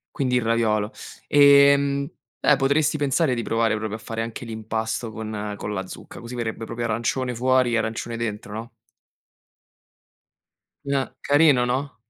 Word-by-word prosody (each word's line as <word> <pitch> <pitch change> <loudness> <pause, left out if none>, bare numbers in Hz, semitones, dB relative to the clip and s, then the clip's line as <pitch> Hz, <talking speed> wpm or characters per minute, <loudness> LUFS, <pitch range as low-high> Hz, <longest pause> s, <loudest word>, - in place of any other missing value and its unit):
Quindi 125 -2 0
il 125 - +2
raviolo. 110 -2 +1 0.3
Ehm. 140 -1 +5 0.4
Eh 150 - +6
potresti 145 +3 +1
pensare 145 0 +1
di 120 - -2
provare 115 -1 +1
proprio 110 0 -4
a - - -11
fare 115 +1 -6
anche 115 +2 -6
l'impasto 110 0 -3
con 105 -1 -5
con 105 - -5
la 95 -2 -3
zucca, - - -10
così 120 +1 -8
verrebbe 115 -1 -4
proprio 115 +1 -4
arancione 120 +3 -1
fuori 130 0 +2
e - - +3
arancione 115 +1 -3
dentro, 105 -2 -4
no? 115 +2 -7 2.1
N 140 - -2
eh, - - -8
carino, 145 -4 +4
no. 130 +3 -2
115 Hz, 155 wpm, -23 LUFS, 110-135 Hz, 2.1 s, Eh